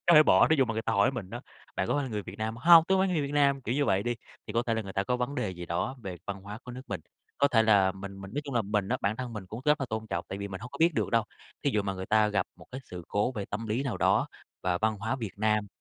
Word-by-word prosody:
có 170 - +7
thể 155 - +10
bỏ, - - +5
thí 160 - +4
dụ 135 - +4
mà 115 - -2
người 110 0 -2
ta - - -1
hỏi 100 +5 +4
mình 110 -8 -6
đó: - - -5 0.4
"Bạn 95 - 0
có - - +1
phải 145 - +1
là - - -4
người 105 -1 -2
Việt 100 +3 -10
Nam?" 110 +1 -2
"Hông, 165 +5 +8
tôi 190 0 +4
phải 190 - +3
người 155 - +1
Việt 140 0 -3
Nam." 140 -2 +3
Kiểu 120 0 -2
như 145 0 +2
vậy 95 -3 +2
đi, 120 +1 -1 0.3
thì - - -6
có 115 +1 +2
thể 115 - +1
là 110 - -1
người 95 -1 -8
ta 100 -1 0
có 125 +3 0
vấn 125 +3 -2
đề 105 - -1
gì 90 -1 -7
đó 90 +10 -2
về 95 -3 -5
văn 100 -1 -4
hóa 105 +2 -7
của 125 - -8
nước 130 +1 -8
mình. 100 -4 -3 0.4
Có 140 - +4
thể 115 -4 +4
là 100 -4 +4
mình 100 0 -8
mình 95 - -8
nói 145 - 0
chung 140 -3 -5
là 115 - +3
mình 100 -1 -1
á, - - +1
bản 105 +2 0
thân 125 -2 -5
mình 105 -4 -6
cũng 110 +6 -7
rất 150 0 +3
là 135 - -1
tôn 110 0 -3
trọng 85 -4 -3
tại 95 - -5
vì 100 0 -4
mình 95 0 -7
hông 125 +2 -8
có - - -9
biết 165 0 +4
được - - 0
đâu. 115 -1 +3 0.4
Thí 140 - +3
dụ 105 -3 +1
mà 95 -1 -2
người 95 0 -6
ta 110 0 +4
gặp 105 -2 0
một - - -15
cái 130 - -5
sự 90 -2 -9
cố 105 +5 +1
về 105 -4 -4
tâm 110 +3 -5
lý 115 +5 0
nào 135 -4 -2
đó, - - +3 0.4
và 90 -1 +1
văn 110 0 +1
hóa 110 +6 -2
Việt 110 -6 -5
Nam, 105 -1 +2
110 Hz, 345 wpm, -29 LUFS, 100-130 Hz, 0.4 s, thể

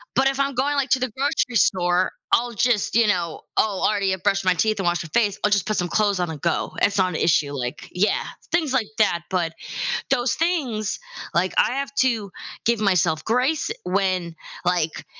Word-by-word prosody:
But, 265 +1 +4
if 270 0 -1
I'm 275 -1 0
going, 280 +3 +1
like, 280 -1 0
to 260 - +4
the 255 0 -1
grocery 265 -2 0
store, 180 -3 +2 0.2
I'll 240 0 +2
just, 225 -1 +1
you 230 -1 +5
know 175 -5 -1 0.2
Oh, 205 -3 +1
already 200 -2 +1
I - - -2
brushed 195 +1 0
my 185 - +4
teeth, 215 +4 0
and 190 - -1
wash 175 0 +1
my 165 - -10
face, 210 -4 +2
I'll 210 - +2
just 200 -3 +2
put 215 - 0
some 180 - 0
clothes 205 +1 +1
on 175 -1 -1
and 155 -3 -7
go, 170 - 0
it's 200 0 +2
not 185 -1 +3
an 165 - -5
issue, 150 -3 +2
like 125 0 -5
yeah, 195 +4 +1 0.3
things 320 -5 +1
like 240 -5 +1
that, 170 -5 +2
but 170 -3 -1 0.6
those 245 -2 +1
things, 270 - -1 0.3
like, 180 +2 +1
I - - +3
have 275 +1 -3
to 225 -7 +1 0.3
give 235 -1 +2
myself 170 -6 +2
grace 255 +7 +1
when, 185 -3 -1 0.3
like 175 -3 0
205 Hz, 205 wpm, -23 LUFS, 180-245 Hz, 0.6 s, you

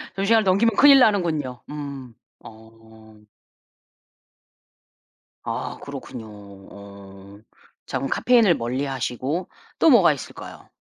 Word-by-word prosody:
그 195 +1 -2
시간을 220 0 +3
넘기면 200 +3 +2
큰일 280 -1 +7
나는군요. 165 - 0
음 140 -5 -8 0.3
어. 110 -1 -17 2.2
아 - - -5
그렇군요. 115 -3 -9
어 100 -1 -14 0.5
자 - - -4
그럼 135 +1 -3
카페인을 230 -7 +3
멀리하시고 130 +5 -4 0.3
또 325 - +5
뭐가 190 - +5
있을까요? 135 - -11
130 Hz, 220 characters per minute, -22 LUFS, -, 2.2 s, 큰일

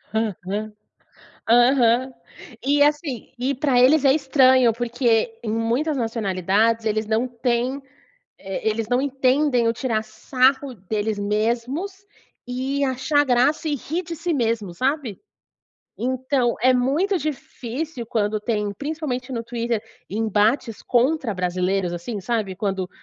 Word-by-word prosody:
Aham, 210 0 -2 0.8
aham. 245 +1 +4 0.5
E, 285 +2 +4
assim, 295 -6 -1
e 270 +3 0
pra 260 -2 +2
eles 280 +3 +5
é 270 - +6
estranho, 260 -4 +4
porque 235 -1 0
em 215 - -2
muitas 240 +7 0
nacionalidades 225 0 +1
eles 215 0 0
não 225 +3 +1
têm, 245 +2 -1 0.6
eh, 195 +2 -4
eles 220 0 -2
não 250 +2 +1
entendem 265 -2 +2
o 230 - +2
tirar 225 -3 -1
sarro 255 +5 +1
deles 210 +2 -3
mesmos 240 - -2 0.4
e 265 +3 -2
achar 265 +3 +1
graça 265 +5 +2
e 295 - 0
rir 320 +6 -4
de 335 -1 -6
si 340 +2 -3
mesmo, 225 - -1
sabe. 260 - -2 0.8
Então 255 0 0
é 255 - +6
muito 305 +10 +1
difícil 270 -2 -5
quando 215 -2 0
tem, 210 -2 -1
principalmente 280 -2 -4
no 230 - -3
Twitter, 230 -1 -2 0.3
embates 220 +2 0
contra 255 -2 +1
brasileiros, 180 0 -1
assim, 195 +5 -5
sabe 215 -2 -2
quando, 190 -2 -2
245 Hz, 130 wpm, -22 LUFS, 220-270 Hz, 0.8 s, é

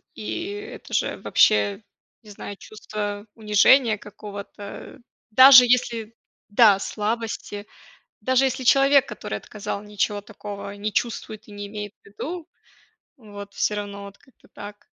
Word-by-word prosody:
и 340 - -5
это 415 +2 -9
же - - 0
вообще, 205 -1 +2 0.4
не 215 - -15
знаю, 205 0 -8
чувство 205 -1 -6
унижения 220 +2 +4
какого-то, 205 0 -10 0.3
даже 260 +2 +9
если 235 -2 0 0.3
да, 205 -2 +5
слабости, 210 -1 -4 0.6
даже 260 +4 +2
если 260 0 -2
человек, 275 +1 +5
который 105 - -5
отказал, 200 - -6
ничего 205 0 -2
такого 205 -1 -8
не 210 +1 -4
чувствует 220 -1 -3
и - - -14
не 205 0 -7
имеет 205 0 -7
в - - -35
виду. 315 - -7 0.7
Вот, 205 -4 -11
всё 210 - 0
равно 200 -1 -6
вот 200 0 -12
как-то 265 - -25
так. 205 0 -11
210 Hz, 130 wpm, -23 LUFS, 205-240 Hz, 0.7 s, даже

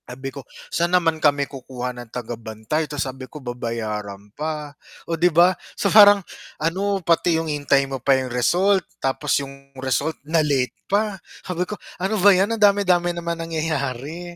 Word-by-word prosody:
Sabi 130 +2 -7
ko, 140 - -7 0.3
"Saan 175 +1 +3
naman 165 -3 0
kami 145 -1 +3
kukuha 125 -2 -6
ng 120 -1 -10
tagabantay?" 115 +5 -4
Tas 145 -1 -2
sabi 130 0 -7
ko, - - -10
"Babayaran 110 -6 -5
pa." 150 0 -4 0.3
O 170 - -3
di 175 +2 +3
ba, 175 +3 +5 0.2
so - - +1
parang 205 -1 +9 0.4
ano, 195 +5 0
pati 170 0 +3
yung 165 - -2
hintay 145 -2 +2
mo 135 -1 -5
pa 135 +1 +4
yung 130 -2 -3
result 185 +10 +3 0.2
tapos 135 0 0
yung 140 0 -14
result 135 +4 -1
na-late 150 -5 +1 0.2
pa 210 0 +1 0.3
sabi 180 -1 -1
ko 210 +3 -7 0.2
ano 205 +2 0
ba 200 +1 +7
yan 195 +4 +2
ang 225 - -2
dami-dami 185 -4 +3
naman 170 -1 -3
nangyayari. 160 0 -3
150 Hz, 165 wpm, -22 LUFS, 130-175 Hz, 0.4 s, parang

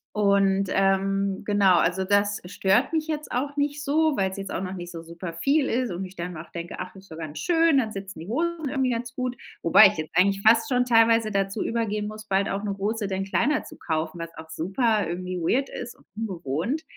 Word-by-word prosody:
und, 200 -1 +3
ähm, 195 0 +1
genau 200 -3 +4
also, 180 +3 +2
das 205 +1 +2
stört 195 - +1
mich 315 -1 0
jetzt 305 -1 -4
auch 280 +4 -2
nicht 290 0 -1
so, 310 +1 +2
weil's 190 0 -1
jetzt 195 - -5
auch - - -2
noch 185 0 -4
nicht 175 -1 -7
so 165 -1 -8
super 170 +1 -7
viel 275 - +2
ist 245 -4 0
und 185 +2 -4
ich 185 +1 -11
dann 175 0 -5
auch 165 +2 -9
denke: 170 0 -6
„Ach, 185 +1 -7
ist 190 -3 -14
doch - - -8
ganz 155 -2 -6
schön, 330 -4 +3
dann 220 -4 0
sitzen 195 -3 -7
die 165 - -8
Hosen 320 +5 -1
irgendwie 265 -2 0
ganz 235 +1 -3
gut", 250 -1 -3 0.3
wobei 185 +5 +8
ich 180 - +1
jetzt 155 - -4
eigentlich 195 +2 +3
fast 225 +5 +5
schon 250 -1 +2
teilweise 225 -2 +4
dazu 195 +1 -1
übergehen 210 -2 -1
muss, 215 0 -9
bald 195 0 +1
auch 200 +2 -3
'ne 200 -1 -2
Hose 210 +2 -2
denn 190 0 -2
kleiner 285 +9 +1
zu - - -12
kaufen, 160 +1 -3
was 165 0 -7
auch 160 0 -10
super 205 +7 0
irgendwie 180 +1 -4
weird 260 +11 +1
ist 240 0 -7
und - - -25
ungewohnt. 190 - -2
200 Hz, 225 wpm, -25 LUFS, 185-245 Hz, 0.3 s, wobei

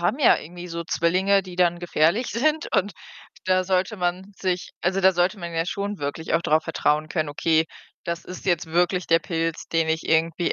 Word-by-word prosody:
haben 175 +10 0
ja 280 - +6
irgendwie 175 +2 -9
so 170 0 -4
Zwillinge, 190 +4 +2
die 180 -1 -10
dann 175 -1 +2
gefährlich 175 +6 +1
sind 305 +6 0
und 200 +1 +1 0.5
da 185 0 +3
sollte 190 +3 0
man 180 +2 -2
sich 185 -2 -2
also, 190 +2 0
da 190 0 +5
sollte 180 +4 +1
man 170 -2 -6
ja 165 0 0
schon 200 +2 -3
wirklich 145 +3 -3
auch 165 - +2
drauf 155 +1 +2
vertrauen 155 -1 0
können: 155 -2 -1
„Okay, 160 +2 +2 0.4
das 170 0 -4
ist 180 - -9
jetzt 175 -4 +1
wirklich 175 +2 +1
der 165 0 +4
Pilz, 165 -1 -3
den 165 -1 +1
ich 160 0 -1
irgendwie 165 +1 +1
175 Hz, 200 wpm, -24 LUFS, 165-190 Hz, 0.5 s, ja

